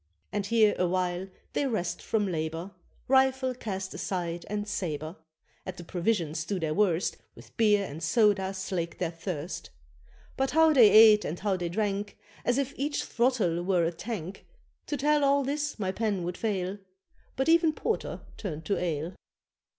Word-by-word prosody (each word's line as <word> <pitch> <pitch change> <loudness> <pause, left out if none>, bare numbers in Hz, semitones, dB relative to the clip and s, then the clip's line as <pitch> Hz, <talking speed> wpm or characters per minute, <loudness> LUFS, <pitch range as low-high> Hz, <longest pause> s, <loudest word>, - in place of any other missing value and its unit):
And 200 -1 -2
here 220 -1 +4
awhile 180 0 0 0.3
they 285 - +1
rest 175 -8 -2
from 215 -2 0
labour, 165 +1 -3 0.4
Rifle 265 0 +3
cast 195 -5 -5
aside 175 -2 -3
and 205 0 -3
sabre; 160 -5 -3 0.5
At 185 - -7
the 175 - -8
provisions 170 -3 -1
do 190 +3 -2
their 160 -2 -1
worst, 185 -2 +1 0.2
With - - -16
beer 210 -3 +3
and 155 -1 -8
soda 195 +2 +2
slake 185 -3 -3
their 175 -2 -1
thirst; 165 -1 -5 0.7
But 270 0 +1
how 320 0 +5
they 240 -7 +8
ate 215 -1 +8
and 170 - -4
how 200 -1 0
they 175 -2 -3
drank, 205 +2 -2 0.3
As 245 - +1
if 275 -1 -1
each 290 +2 -1
throttle 230 -9 +1
were 180 -2 +2
a 165 - 0
tank 190 0 -6 0.4
To 290 - -2
tell 295 +2 +2
all 280 0 +4
this 290 +2 -2
my 190 -4 -1
pen 205 -3 -1
would 175 +1 -3
fail; 195 -2 -2 0.6
But 265 - 0
even 330 -1 +5
Porter 450 +8 -3 0.2
turned 160 -6 -5
to 200 - 0
ale. 165 0 -2
195 Hz, 165 wpm, -28 LUFS, 175-230 Hz, 0.7 s, they